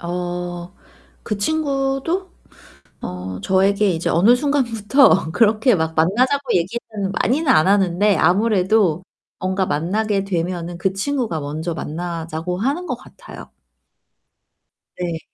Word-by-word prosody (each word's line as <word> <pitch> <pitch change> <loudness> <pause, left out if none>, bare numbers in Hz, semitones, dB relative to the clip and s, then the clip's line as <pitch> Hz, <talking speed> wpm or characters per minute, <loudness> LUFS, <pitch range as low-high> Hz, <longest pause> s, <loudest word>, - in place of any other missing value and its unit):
어 175 0 -5 0.5
그 210 - -3
친구도 285 - -1 0.7
어 90 +1 -6
저에게 195 - +2
이제 165 -1 -2
어느 210 +9 +5
순간부터 250 - +2
그렇게 220 +4 +3
막 160 -2 -1
만나자고 250 - +1
얘기는 200 +2 -2
많이는 290 +5 +1
안 155 +1 +5
하는데 195 0 +3
아무래도 190 -1 +2 0.4
뭔가 190 +1 -1
만나게 200 +6 0
되면은 175 -2 -3
그 190 +2 0
친구가 215 - -2
먼저 155 +4 -4
만나자고 165 +1 -4
하는 280 - -1
것 265 - -2
같아요. - - -13 1.5
네. 170 -2 -3
195 Hz, 250 characters per minute, -20 LUFS, 175-235 Hz, 1.5 s, 어느